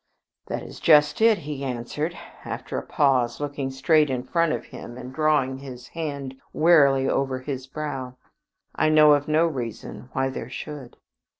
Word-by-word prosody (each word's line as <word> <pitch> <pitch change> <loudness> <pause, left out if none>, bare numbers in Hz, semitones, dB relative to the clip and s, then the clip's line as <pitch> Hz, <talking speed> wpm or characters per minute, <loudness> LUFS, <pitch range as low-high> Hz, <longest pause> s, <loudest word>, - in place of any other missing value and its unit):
"That - - -4
is - - -10
just 150 +2 +5
it," 225 -1 +6
he 145 -2 -5
answered, 135 +6 -3 0.3
after - - -6
a - - -1
pause, 130 -5 +1
looking 145 -2 -3
straight 150 +3 +3
in 125 -2 -2
front 165 +4 +1
of - - -3
him 120 - -10
and 125 +1 -8
drawing 145 -3 +1
his 125 -2 -10
hand 140 -5 -5
wearily 140 -5 +5
over 135 -1 0
his 130 -1 -5
brow. 135 -3 -5 0.6
"I 155 - +2
know 155 -1 +7
of 145 0 +1
no 155 +2 +3
reason 125 -4 -5
why 135 0 0
there 125 -2 -6
should." 140 -2 -8
140 Hz, 165 wpm, -24 LUFS, 130-155 Hz, 0.6 s, know